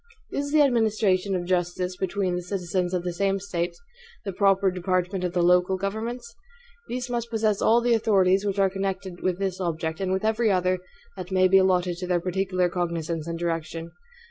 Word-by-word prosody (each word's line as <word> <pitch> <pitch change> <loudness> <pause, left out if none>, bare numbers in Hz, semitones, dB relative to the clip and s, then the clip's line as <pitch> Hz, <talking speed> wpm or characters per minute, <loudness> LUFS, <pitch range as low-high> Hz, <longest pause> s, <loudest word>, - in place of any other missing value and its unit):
Is 285 0 -2
the 305 -1 +5
administration 215 -6 +2
of 175 -1 -2
justice 180 0 -1
between 190 -1 -1
the 180 - -2
citizens 180 -1 -2
of 175 - -2
the 180 -1 -3
same 195 +2 0
State 175 -3 -3 0.5
the 195 - -3
proper 195 0 +3
department 185 +1 -1
of 180 -1 -2
the 175 -1 +2
local 180 +2 +3
governments? 230 +5 -4 0.5
These 250 +1 -4
must 235 -1 -3
possess 215 -2 0
all 230 +2 +4
the 240 0 +2
authorities 195 -4 +3
which 200 -1 -2
are 195 -1 +4
connected 190 -1 -4
with 185 -1 0
this 190 -1 -3
object, 160 -2 -2
and 190 -1 -1
with 190 +3 0
every 220 +1 +2
other 185 -1 +1 0.4
that 185 -1 -6
may 185 0 +4
be 195 +1 +6
allotted 180 -2 +2
to 180 0 -5
their 180 -1 +2
particular 185 0 0
cognizance 170 -2 -3
and 170 0 -3
direction. 165 -1 -3
185 Hz, 190 wpm, -25 LUFS, 180-200 Hz, 0.5 s, be